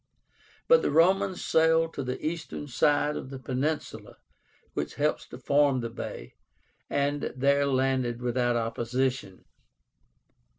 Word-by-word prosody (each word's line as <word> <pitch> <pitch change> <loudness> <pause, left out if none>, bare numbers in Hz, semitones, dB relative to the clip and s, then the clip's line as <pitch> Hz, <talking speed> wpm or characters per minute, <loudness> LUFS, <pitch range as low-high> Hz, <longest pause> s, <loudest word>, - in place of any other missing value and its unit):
But 485 0 +6
the - - 0
Romans 185 +5 +2
sailed 160 0 +3
to - - -4
the 125 -1 -4
eastern 160 -2 -4
side 145 +3 +2
of - - -6
the 135 - -7
peninsula 135 +4 -3 0.6
which 75 0 -4
helps 145 -4 -1
to - - -10
form 140 0 +2
the 115 -1 -5
bay, - - -7 0.6
and 140 +1 -1
there 140 +2 +3
landed 130 -3 0
without 120 0 0
opposition. 120 -2 -2
135 Hz, 125 wpm, -27 LUFS, 125-150 Hz, 0.6 s, But